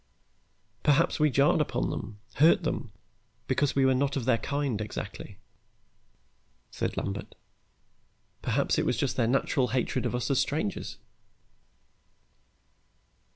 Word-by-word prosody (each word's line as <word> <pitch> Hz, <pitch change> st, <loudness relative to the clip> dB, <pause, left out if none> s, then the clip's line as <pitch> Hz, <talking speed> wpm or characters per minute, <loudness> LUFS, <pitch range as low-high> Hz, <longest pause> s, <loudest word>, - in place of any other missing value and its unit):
"Perhaps 145 Hz, +1 st, +3 dB
we 150 Hz, 0 st, +4 dB
jarred 140 Hz, +3 st, +3 dB
upon 125 Hz, -4 st, -1 dB
them, 105 Hz, -2 st, -6 dB, 0.2 s
hurt 170 Hz, +6 st, +5 dB
them, 120 Hz, -8 st, -3 dB, 0.5 s
because 135 Hz, +2 st, +1 dB
we 135 Hz, -1 st, +4 dB
were 130 Hz, -, +4 dB
not 140 Hz, +2 st, 0 dB
of 125 Hz, -, -3 dB
their 120 Hz, -3 st, +3 dB
kind 140 Hz, -7 st, -2 dB
exactly," 105 Hz, -, -6 dB, 1.3 s
said -, -, -3 dB
Lambert. 100 Hz, 0 st, -4 dB, 1.1 s
"Perhaps -, -, +1 dB
it -, -, 0 dB
was -, -, +1 dB
just -, -, 0 dB
their 115 Hz, -, +1 dB
natural 130 Hz, 0 st, +1 dB
hatred 130 Hz, -1 st, -1 dB
of -, -, -3 dB
us 125 Hz, +2 st, -1 dB
as 135 Hz, -, +3 dB
strangers." 145 Hz, -9 st, -2 dB
135 Hz, 125 wpm, -28 LUFS, 120-145 Hz, 1.3 s, hurt